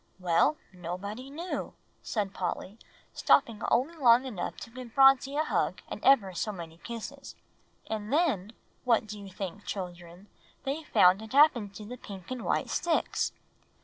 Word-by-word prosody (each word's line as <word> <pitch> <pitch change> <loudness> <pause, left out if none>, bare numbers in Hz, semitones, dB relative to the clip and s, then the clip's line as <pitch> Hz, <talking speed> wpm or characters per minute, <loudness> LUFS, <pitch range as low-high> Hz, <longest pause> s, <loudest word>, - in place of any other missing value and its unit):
] - - -38
"Well, 170 - +4 0.2
nobody 190 +8 -6
knew," 335 +6 -5 0.3
said 205 -3 -2
Polly, 190 +3 -4 0.3
stopping 230 -2 +3
only 285 +8 +2
long 250 -4 +5
enough 220 -9 -4
to 230 - -9
give 245 -1 -9
Phronsie 270 0 +5
a 310 - +3
hug - - -1
and - - -7
ever 215 -9 +5
so 180 +5 -2
many 165 -4 -9
kisses. 235 +7 -8 0.5
"And 215 -1 -4
then, 275 - +1 0.3
what 235 -3 +3
do 210 0 -8
you 200 -1 -9
think, 190 +1 -6
children, 175 0 -7 0.4
they 280 +4 -2
found 190 -9 +4
had 220 +3 -9
happened 245 -9 +4
to 210 - -8
the 250 +4 -7
pink 195 -2 -10
and 255 -2 -4
white - - 0
sticks?" 340 -2 0
220 Hz, 160 wpm, -29 LUFS, 190-270 Hz, 0.5 s, long